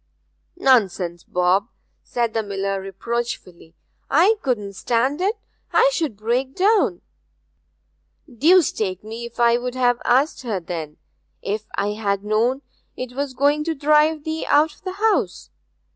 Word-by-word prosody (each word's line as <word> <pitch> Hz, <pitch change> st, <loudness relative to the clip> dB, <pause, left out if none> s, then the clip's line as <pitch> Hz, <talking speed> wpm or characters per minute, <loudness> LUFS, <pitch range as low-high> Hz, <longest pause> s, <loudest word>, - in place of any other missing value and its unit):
'Nonsense, 190 Hz, -9 st, +2 dB
Bob!' 180 Hz, +3 st, +1 dB, 0.3 s
said 235 Hz, -2 st, -2 dB
the 225 Hz, -, +1 dB
miller 195 Hz, -1 st, -3 dB
reproachfully. 195 Hz, -4 st, -5 dB, 0.3 s
'I 350 Hz, +9 st, +5 dB
couldn't 210 Hz, -7 st, -2 dB
stand 250 Hz, -, 0 dB
it 410 Hz, +4 st, 0 dB, 0.3 s
I -, -, +4 dB
should 310 Hz, -, -2 dB
break 245 Hz, +5 st, -1 dB
down.' 420 Hz, +3 st, +2 dB, 1.3 s
'Deuce 315 Hz, +6 st, +4 dB
take 190 Hz, -3 st, -3 dB
me 225 Hz, +2 st, -7 dB
if 235 Hz, -, -16 dB
I 235 Hz, 0 st, +4 dB
would 250 Hz, +1 st, -4 dB
have 245 Hz, -1 st, +2 dB
asked 270 Hz, +5 st, +2 dB
her, 225 Hz, -6 st, -2 dB
then, 165 Hz, -3 st, -6 dB, 0.5 s
if 215 Hz, +1 st, -3 dB
I 200 Hz, +1 st, 0 dB
had 205 Hz, -2 st, -2 dB
known 230 Hz, +6 st, +1 dB, 0.3 s
'twas 260 Hz, +2 st, -4 dB
going 290 Hz, +3 st, +2 dB
to 325 Hz, -1 st, -1 dB
drive 300 Hz, +1 st, +3 dB
thee 315 Hz, +1 st, -3 dB
out 300 Hz, +2 st, +3 dB
of -, -, -23 dB
the 370 Hz, -1 st, -5 dB
house! 425 Hz, +2 st, 0 dB
240 Hz, 140 wpm, -22 LUFS, 200-295 Hz, 1.3 s, I